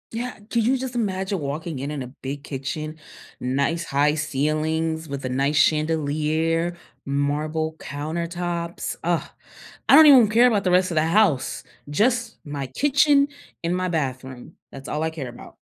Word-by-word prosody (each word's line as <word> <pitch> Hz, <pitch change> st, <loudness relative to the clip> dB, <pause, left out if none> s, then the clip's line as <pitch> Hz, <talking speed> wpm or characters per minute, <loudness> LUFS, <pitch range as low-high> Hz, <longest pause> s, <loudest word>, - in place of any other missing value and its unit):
Yeah. 245 Hz, +2 st, -3 dB, 0.2 s
Could 230 Hz, -2 st, +1 dB
you 260 Hz, +3 st, +3 dB
just 260 Hz, -1 st, -5 dB
imagine 195 Hz, -3 st, -1 dB
walking 150 Hz, +1 st, -4 dB
in 140 Hz, +2 st, -4 dB
in 145 Hz, -3 st, -4 dB
a -, -, -7 dB
big 135 Hz, +2 st, -7 dB
kitchen, 155 Hz, +3 st, -5 dB, 0.4 s
nice 140 Hz, +7 st, -1 dB
high 145 Hz, +2 st, +2 dB
ceilings 155 Hz, +2 st, -1 dB
with 140 Hz, -1 st, -5 dB
a -, -, -2 dB
nice 140 Hz, +3 st, 0 dB
chandelier, 155 Hz, +2 st, +1 dB, 0.3 s
marble 150 Hz, +3 st, -1 dB
countertops? 170 Hz, +3 st, -4 dB
Ugh. 170 Hz, -1 st, +1 dB, 0.7 s
I -, -, +9 dB
don't 315 Hz, -, +10 dB
even 275 Hz, -3 st, +10 dB
w 215 Hz, -, +2 dB
care 240 Hz, +2 st, +6 dB
about 210 Hz, -5 st, +2 dB
the 180 Hz, -, +2 dB
rest 185 Hz, 0 st, +3 dB
of -, -, -3 dB
the 155 Hz, 0 st, +3 dB
house, 165 Hz, -6 st, +2 dB, 0.3 s
just 230 Hz, -, +1 dB
my 145 Hz, -2 st, -4 dB
kitchen 280 Hz, -, +3 dB, 0.4 s
and 170 Hz, +1 st, 0 dB
my 185 Hz, 0 st, -1 dB
bathroom. 130 Hz, -3 st, -4 dB, 0.2 s
That's 135 Hz, 0 st, -9 dB
all 150 Hz, -, -2 dB
I 160 Hz, -, 0 dB
care 145 Hz, -6 st, -6 dB
about. 120 Hz, -, -12 dB
160 Hz, 165 wpm, -23 LUFS, 145-185 Hz, 0.7 s, don't